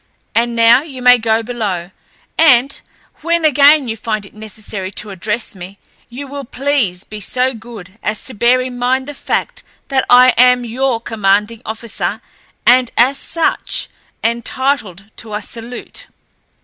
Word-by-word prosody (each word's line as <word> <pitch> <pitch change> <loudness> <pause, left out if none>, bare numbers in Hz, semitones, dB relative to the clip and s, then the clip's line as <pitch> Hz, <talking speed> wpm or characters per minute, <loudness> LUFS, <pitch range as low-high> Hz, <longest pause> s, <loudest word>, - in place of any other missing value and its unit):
"And 235 +1 +1
now 230 +2 +6
you 280 -4 -10
may 250 0 +6
go 225 0 +1
below, 205 -7 -4 0.4
and, 275 -4 +4 0.4
when 335 0 0
again 290 -1 +5
you 220 - -3
find 215 -2 -3
it - - -16
necessary 210 -2 -6
to 210 +1 -5
address 210 +4 -3
me, 190 +1 -10 0.3
you 255 +4 -7
will 280 +1 -7
please 255 -8 -1
be 215 - -9
so 255 +6 0
good 220 -4 -12
as 210 0 -3
to 260 - -5
bear 240 +4 +3
in 250 -1 -6
mind 260 +2 +1
the 290 - -5
fact - - -3 0.3
that 270 -1 +1
I 250 +1 +7
am 250 0 +5
your 245 +1 -1
commanding 210 0 0
officer, 220 +1 -3 0.5
and 250 0 +5
as 265 +4 +3
such 330 -1 -1 0.3
entitled 230 -4 -1
to 215 -3 -6
a 210 - -3
salute." 235 +3 -9
235 Hz, 150 wpm, -16 LUFS, 215-260 Hz, 0.5 s, I